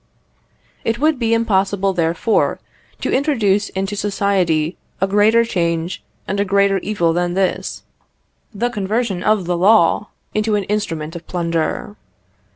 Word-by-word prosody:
It 225 +1 0
would 305 0 +1
be 230 -2 0
impossible, 195 -3 +1
therefore, 170 +5 +1 0.4
to - - -1
introduce 215 -8 +1
into 195 +2 -3
society 190 -5 0 0.2
a 195 - +2
greater 210 +4 +4
change 170 -4 -1 0.3
and 200 +1 -2
a - - +3
greater 200 0 +2
evil 175 -5 0
than 175 +1 -1
this 190 -1 -1 0.7
the 240 +3 -2
conversion 210 -2 -1
of 210 -2 +2
the 175 0 0
law 200 +1 +4 0.3
into 215 0 +1
an 205 - 0
instrument 165 -6 -3
of 170 -1 -9
plunder. 170 +3 -2
195 Hz, 135 wpm, -19 LUFS, 175-215 Hz, 0.7 s, greater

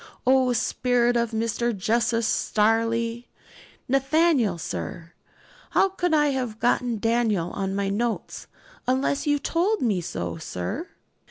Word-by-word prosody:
O 260 0 +4
spirit 245 0 +1
of 235 -1 +1
Mr. 230 0 -1
Justice 230 +3 +1
Stareleigh! 230 +3 +1 0.6
'Nathaniel, 270 - +2
sir? 160 - -6 0.6
How 390 - +5
could 355 -2 -1
I 295 -2 +4
have 250 -5 -3
got 240 -1 +1
Daniel 225 -6 +1
on 195 -1 -3
my 200 0 -1
notes, 230 +3 -3 0.4
unless 265 +3 0
you 290 0 +3
told 360 +7 0
me 205 -7 +1
so, 165 - -4
sir?' 90 - -5
235 Hz, 120 wpm, -25 LUFS, 215-260 Hz, 0.6 s, How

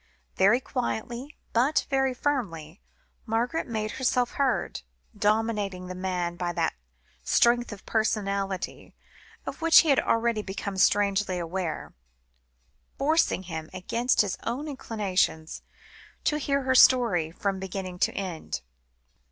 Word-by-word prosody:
Very 205 +6 +5
quietly, 250 +2 -4 0.2
but 255 +7 +2
very 270 -1 +2
firmly, 190 - -3 0.5
Margaret 235 +8 0
made 215 -2 -2
herself 250 -1 +1
heard, 275 -3 0 0.3
dominating 210 -3 0
the 185 - -6
man 180 -2 -2
by 175 -1 -2
that 165 -1 0 0.5
strength 240 0 +3
of 200 -2 -10
personality, 200 -3 -2 0.5
of - - -6
which 330 0 +8
he 325 - -1
had 275 - +5
already 230 -1 +1
become 195 0 -5
strangely 200 -1 +2
aware; 175 -1 -4 1.0
forcing 300 - +2
him, 160 -3 -6
against 235 +7 +1
his 200 -3 -2
own 260 +6 -3
inclinations, 190 - -1 0.6
to 300 - +1
hear 280 -1 0
her 260 0 +2
story, 235 -11 +5
from 190 +3 -2
beginning 190 -1 -5
to - - +2
end. 180 -5 -4
210 Hz, 120 wpm, -27 LUFS, 185-250 Hz, 1.0 s, which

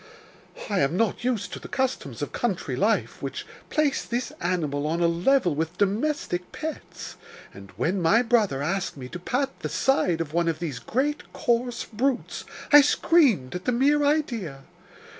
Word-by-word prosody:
I 200 -3 0
am 140 +5 +1
not 225 +1 0
used 235 -5 -1
to - - -5
the - - -9
customs 265 -1 -2
of - - -4
country - - -2
life, - - 0
which - - -5 0.2
place 305 -3 +1
this 240 +1 -3
animal 150 -5 -1
on 165 +2 -1
a 170 - +3
level 175 - +2
with 160 +4 -3
domestic 205 -2 -1
pets, 315 -1 -7 0.4
and 100 0 -12
when 175 - 0
my 205 +9 +4
brother 215 - +2
asked 190 +1 -2
me 130 -2 -7
to 180 - -7
pat 255 +9 -2
the - - -4
side 185 - +2
of 160 -2 -4
one 170 0 +1
of 165 -2 0
these 155 -7 -4
great, 270 - -2
coarse 240 0 0
brutes, 250 +3 -2 0.3
I 295 - +11
screamed 275 - +3
at 180 +1 -5
the - - +2
mere 285 +5 +3
idea. 235 - -1
205 Hz, 170 wpm, -25 LUFS, 165-265 Hz, 0.4 s, I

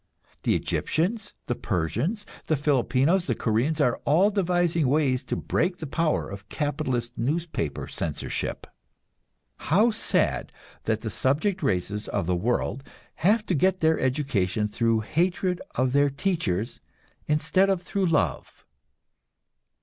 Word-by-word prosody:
The - - +2
Egyptians, 195 +7 -1
the - - -1
Persians, 120 - -2 0.2
the 155 - +3
Filipinos, 145 +5 +2
the 120 - +1
Koreans, 120 +10 0
are 125 -5 +2
all 180 +8 +4
devising 175 -5 +1
ways 135 -2 +2
to - - -2
break 175 +2 0
the 160 - -6
power 155 +2 0
of 100 +1 -9
capitalist 130 -5 -2
newspaper 145 - -2
censorship. - - -3 1.0
How 210 +9 +5
sad 215 - 0 0.3
that 110 -1 0
the 110 - -4
subject 175 +9 +1
races 100 +3 -1
of - - -1
the 90 +1 +1
world 120 +6 -1 0.3
have 210 +6 +3
to 185 - 0
get 185 +4 +2
their 160 0 +3
education 115 -7 0
through 115 +1 +1
hatred 180 - 0
of 130 +1 +1
their 145 0 +4
teachers, 135 - -2 0.5
instead 185 +6 +2
of 185 -2 0
through 195 -2 0
love! 145 - -1
145 Hz, 130 wpm, -26 LUFS, 120-175 Hz, 1.0 s, How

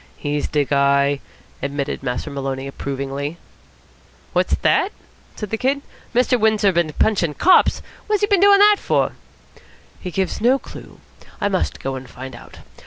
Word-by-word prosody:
"He's 145 0 -2
de 145 -2 +1
guy!" 140 0 +2 0.4
admitted 140 0 -3
Master 125 +2 -3
Maloney 135 -1 -4
approvingly. 140 +2 -4 1.0
"What's - - +2
that?" 385 +2 +2 0.4
said 210 -2 -6
the 225 - -2
Kid. 275 +2 0 0.3
"Mr. 250 0 +3
Windsor 215 -2 +3
bin 170 -3 0
punchin' 175 -8 +1
cops! 370 - +4 0.2
What's 420 -2 +1
he 415 - +3
bin 405 -3 +3
doin' 400 0 +7
that 415 +1 +6
for?" - - +1 0.9
"He 185 - -6
gives 190 +2 -2
no 250 +4 +4
clue. - - -12 0.4
I 205 - 0
must 190 -2 -1
go 135 - -3
and 130 -1 -7
find 130 -1 -9
out. - - -13
155 Hz, 155 wpm, -20 LUFS, -, 1.0 s, doin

